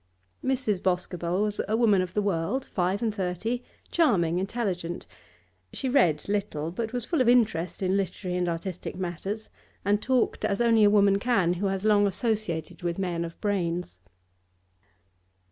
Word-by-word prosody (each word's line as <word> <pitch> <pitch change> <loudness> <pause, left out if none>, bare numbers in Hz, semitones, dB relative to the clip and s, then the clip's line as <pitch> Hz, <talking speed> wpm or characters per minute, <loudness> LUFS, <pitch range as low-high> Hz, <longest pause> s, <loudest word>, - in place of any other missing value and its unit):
Mrs. 255 -8 0
Boscobel 180 0 0
was 210 -1 -1
a 215 +2 +1
woman 210 -5 +4
of 185 0 -5
the 210 - +2
world, 200 +8 -1
five 185 +4 -1
and 220 -2 0
thirty, 215 +5 -2 0.3
charming, 180 - +3
intelligent; 190 -4 -3 0.7
she 270 - -3
read 180 - +3
little, 195 -6 -2
but 220 +4 -3
was 245 -2 -3
full 325 -1 +1
of 245 - +4
interest 200 -8 +2
in 185 +1 +2
literary 185 -1 -2
and 180 -1 0
artistic 175 +2 -4
matters, 190 +4 -4 0.4
and 205 +1 +2
talked 255 0 +1
as 200 - 0
only 230 -2 +4
a 205 - +7
woman 200 -1 +4
can 200 -7 +2
who 190 +3 -1
has 195 +1 -2
long 205 -1 +5
associated 200 - -2
with 175 -1 -2
men 175 -3 -1
of 165 0 -8
brains. 175 - -1
195 Hz, 160 wpm, -27 LUFS, 175-220 Hz, 0.7 s, a